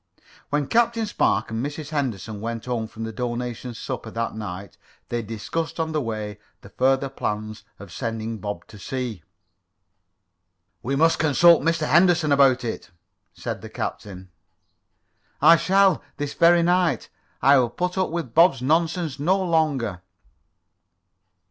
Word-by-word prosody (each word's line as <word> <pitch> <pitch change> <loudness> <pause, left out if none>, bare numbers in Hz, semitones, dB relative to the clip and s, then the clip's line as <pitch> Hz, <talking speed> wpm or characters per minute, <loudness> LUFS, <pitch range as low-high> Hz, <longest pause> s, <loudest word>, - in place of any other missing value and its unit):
When 145 0 0
Captain 230 - +2
Spark 110 - 0
and 110 +2 -2
Mrs. 145 +1 -5
Henderson 115 - -3
went 115 0 -4
home 120 -3 -2
from 115 0 -8
the 110 - -4
donation 120 +1 -4
supper 120 -1 -5
that 115 +1 -3
night 100 -3 -7 0.3
they 120 0 -1
discussed 115 +11 -4
on 160 -1 -1
the 155 -1 0
way 110 -3 -5 0.2
the 100 - -13
further 135 +4 +1
plans 110 -5 -4
of 100 -3 -12
sending 115 +1 -4
Bob 105 +1 -5
to 105 -2 -13
sea. 125 -4 -4 1.6
"We 135 +3 -2
must 165 +3 +3
consult 160 +2 +5
Mr. 160 0 0
Henderson 170 +1 +4
about 135 -3 +4
it," 115 -5 -5 0.5
said 100 +3 -5
the 110 - -9
captain. 95 -4 -6 1.1
"I 165 - +8
shall, 190 +1 +3 0.2
this 145 -1 -3
very 170 0 +5
night. 175 -6 +1 0.3
I 140 0 +6
will 120 -2 +1
put 180 +8 -3
up 190 -1 0
with 165 -8 -4
Bob's 165 -5 +5
nonsense 160 0 0
no 180 +7 +2
longer." 150 - 0
130 Hz, 140 wpm, -23 LUFS, 110-165 Hz, 1.6 s, I